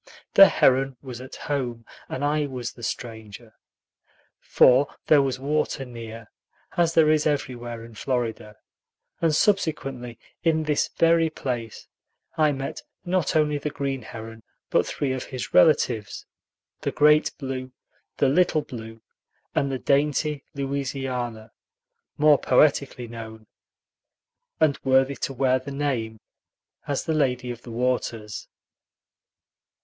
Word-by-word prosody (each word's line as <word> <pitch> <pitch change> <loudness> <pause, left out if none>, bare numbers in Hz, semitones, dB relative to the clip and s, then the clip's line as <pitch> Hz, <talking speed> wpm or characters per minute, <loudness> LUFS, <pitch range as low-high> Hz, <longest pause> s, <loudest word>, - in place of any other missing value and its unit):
The 195 - +10
heron 135 0 +3
was 125 -2 -7
at 130 - -9
home, 125 -5 -3 0.2
and 140 - -2
I 150 0 +1
was 125 -3 -5
the 120 - -14
stranger. 110 -1 -6 0.9
For 130 +3 +5 0.2
there 150 -2 +6
was 135 -2 -1
water 145 0 -1
near, 115 -2 -9 0.4
as 170 -1 +2
there 155 -2 +6
is 155 -1 +2
everywhere 120 -5 -3
in 115 - -13
Florida; 115 -3 -3 0.7
and 160 -2 +3
subsequently, 135 - 0 0.3
in 160 -2 +2
this 150 -1 +1
very 165 -1 +4
place, 120 -7 -5 0.5
I 155 -1 +3
met 135 -1 -5 0.2
not 180 -3 0
only 150 -2 +2
the 150 - -3
green 140 -2 -3
heron, 115 0 -9 0.3
but - - +3
three 135 -3 -2
of 130 - -4
his 130 -2 -6
relatives, 120 -9 +3 0.5
the - - -2
great 150 +1 +4
blue, 130 -1 -5 0.5
the 140 - +3
little 155 +1 +3
blue, 115 -2 -9 0.5
and 140 -1 0
the 135 - -1
dainty 145 +2 +1
Louisiana, 135 -5 -3 0.7
more 150 -1 +5
poetically 135 -2 +2
known 110 -1 -9 1.1
(and 155 -3 +3
worthy 135 +1 +3
to - - -3
wear 130 0 +2
the 130 - -9
name) 130 -6 -2 0.7
as 140 -2 -2
the 160 - 0
"Lady 125 -4 0
of 120 -1 -8
the 125 - -12
Waters." 115 -3 -2
135 Hz, 130 wpm, -25 LUFS, 120-150 Hz, 1.1 s, The